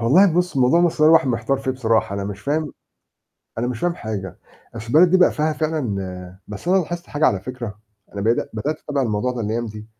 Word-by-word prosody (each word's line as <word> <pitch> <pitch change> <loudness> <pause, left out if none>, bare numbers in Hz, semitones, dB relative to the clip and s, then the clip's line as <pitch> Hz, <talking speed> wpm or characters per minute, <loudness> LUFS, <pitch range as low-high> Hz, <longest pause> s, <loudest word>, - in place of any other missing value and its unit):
والله 160 +11 +5
بُص 180 -3 0
موضوع 135 +6 +4
مصر 175 -3 +1
ده 155 - +4
الواحد 160 -3 +6
محتار 120 +3 0
فيه 130 - -2
بصراحة، 115 -6 0
أنا 100 0 -3
مش 100 0 -6
فاهم 150 +3 -2 0.9
أنا 120 - 0
مش 125 -2 -4
فاهم 175 -1 0
حاجة، 105 - -6 0.4
أصل 115 0 -7
البلد 165 +8 +5
دي 185 - +5
بقى 185 - +4
فيها 155 0 0
فعلًا 100 - -4
بس 105 - -7
أنا 190 - +4
لاحظت 175 0 -2
حاجة 150 +2 +1
على 95 -2 +1
فِكرة، 120 -3 -7 0.4
أنا 100 - -4
بدا 115 +4 +1
بدأت 145 +8 -3
أتابع 145 -2 -2
الموضوع 115 +1 -1
ده 120 - -5
الأيام 115 +2 -2
دي، 105 0 -9
125 Hz, 215 wpm, -21 LUFS, 105-155 Hz, 0.9 s, الواحد